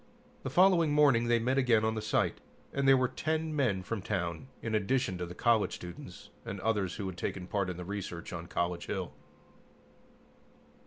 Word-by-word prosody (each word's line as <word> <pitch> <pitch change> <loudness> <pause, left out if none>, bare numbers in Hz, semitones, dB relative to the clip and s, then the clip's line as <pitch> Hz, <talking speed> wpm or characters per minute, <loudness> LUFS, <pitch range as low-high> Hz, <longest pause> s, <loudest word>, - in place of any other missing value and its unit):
The - - -4
following 170 0 +5
morning 140 -6 +4
they 120 0 +4
met 130 +4 +1
again 115 -4 +3
on 110 - +1
the 110 - -3
site, 110 - 0 0.3
and 140 0 +1
there 135 0 +7
were 130 0 +2
ten 155 +4 -2
men 110 -10 +1
from 105 +1 -3
town, 90 +1 -3 0.2
in 115 - -2
addition 110 0 +1
to 90 - -3
the 90 - -9
college 115 -1 +2
students 90 -1 -10
and 100 - -5
others 105 -4 0
who 100 - -4
had 95 -2 -5
taken 90 -2 -3
part 100 0 -1
in 90 - -4
the 90 - -6
research 90 -4 -5
on 85 -1 -6
College 85 0 -2
Hill. 95 -5 -3
110 Hz, 190 wpm, -31 LUFS, 90-130 Hz, 0.3 s, there